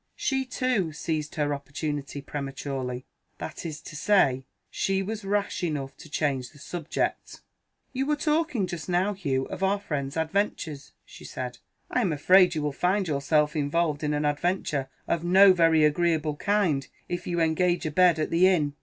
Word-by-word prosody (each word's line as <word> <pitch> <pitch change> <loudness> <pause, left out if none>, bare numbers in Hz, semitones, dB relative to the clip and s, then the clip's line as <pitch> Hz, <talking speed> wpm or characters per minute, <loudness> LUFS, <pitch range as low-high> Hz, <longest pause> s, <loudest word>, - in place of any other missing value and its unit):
She, 265 -1 -1
too, 255 -9 0
seized 155 -1 -3
her 145 -1 0
opportunity 140 0 -4
prematurely. 135 -3 -5 0.3
That - - -6
is 155 -1 -6
to 155 - -10
say, 150 -7 +3 0.3
she 195 0 0
was 215 +2 -5
rash 200 -1 -1
enough 145 -5 -3
to 155 - -13
change 135 -5 -1
the 150 - -19
subject. 165 +2 -3 0.5
"You 270 +1 -1
were 300 - +2
talking 300 - 0
just 175 -1 -6
now, 180 +3 +2
Hugh, 135 -9 -1
of - - -6
our 195 +1 +2
friend's 140 -6 -4
adventures," 160 -3 -2
she - - -13
said; - - -6 0.3
"I 250 - +2
am 190 -7 +1
afraid 180 +4 +5
you 155 - -1
will 150 - 0
find 185 +6 0
yourself 150 +1 +1
involved 150 +1 0
in 150 0 0
an 150 0 -1
adventure 145 -2 -1 0.2
of 170 -1 0
no 190 +2 +7
very 165 -3 +4
agreeable 155 -1 +1
kind, 170 -8 +1 0.2
if 175 0 -4
you 175 -1 -1
engage 170 +2 +1
a 155 - -1
bed 175 +1 +5
at 155 - -2
the 175 +3 +5
inn. 155 -6 +2
160 Hz, 170 wpm, -27 LUFS, 145-190 Hz, 0.5 s, no